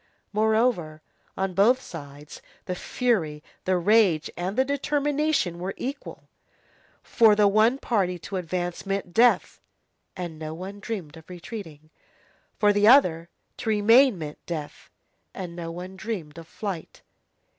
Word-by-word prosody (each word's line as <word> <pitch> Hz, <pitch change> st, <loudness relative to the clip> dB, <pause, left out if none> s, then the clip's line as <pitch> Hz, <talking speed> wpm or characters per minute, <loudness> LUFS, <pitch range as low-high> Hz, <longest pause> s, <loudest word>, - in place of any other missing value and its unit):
Moreover, 215 Hz, -8 st, +1 dB, 0.3 s
on 190 Hz, -1 st, -1 dB
both 225 Hz, +8 st, +4 dB
sides, 145 Hz, -, -10 dB, 0.2 s
the 180 Hz, -, -3 dB
fury, 180 Hz, -8 st, -1 dB, 0.2 s
the 185 Hz, 0 st, +2 dB
rage, 185 Hz, -4 st, +3 dB
and 185 Hz, +5 st, -4 dB
the 260 Hz, -, +3 dB
determination 285 Hz, -, 0 dB
were 190 Hz, +2 st, -4 dB
equal. 270 Hz, +3 st, -6 dB, 0.8 s
For 225 Hz, -3 st, +5 dB
the 205 Hz, -1 st, +4 dB
one 215 Hz, +5 st, +4 dB
party, 195 Hz, -9 st, 0 dB
to 180 Hz, +4 st, -6 dB
advance 175 Hz, 0 st, -3 dB
meant 195 Hz, -3 st, -3 dB
death, 240 Hz, +4 st, +3 dB, 0.6 s
and 170 Hz, -4 st, -6 dB
no 155 Hz, 0 st, -5 dB
one 190 Hz, +4 st, -8 dB
dreamed 190 Hz, -8 st, -6 dB
of 160 Hz, -, -15 dB
retreating; 170 Hz, -5 st, -9 dB, 0.7 s
for 210 Hz, -1 st, +4 dB
the 205 Hz, +1 st, +3 dB
other, 175 Hz, -, +5 dB, 0.3 s
to -, -, -4 dB
remain 225 Hz, +3 st, +5 dB
meant 150 Hz, -2 st, -8 dB
death, 155 Hz, -4 st, -6 dB, 0.5 s
and 180 Hz, -3 st, -6 dB
no 170 Hz, -1 st, -5 dB
one 180 Hz, +2 st, -8 dB
dreamed 180 Hz, -8 st, -5 dB
of 165 Hz, -, -12 dB
flight. 195 Hz, -5 st, -6 dB
190 Hz, 135 wpm, -25 LUFS, 165-225 Hz, 0.8 s, For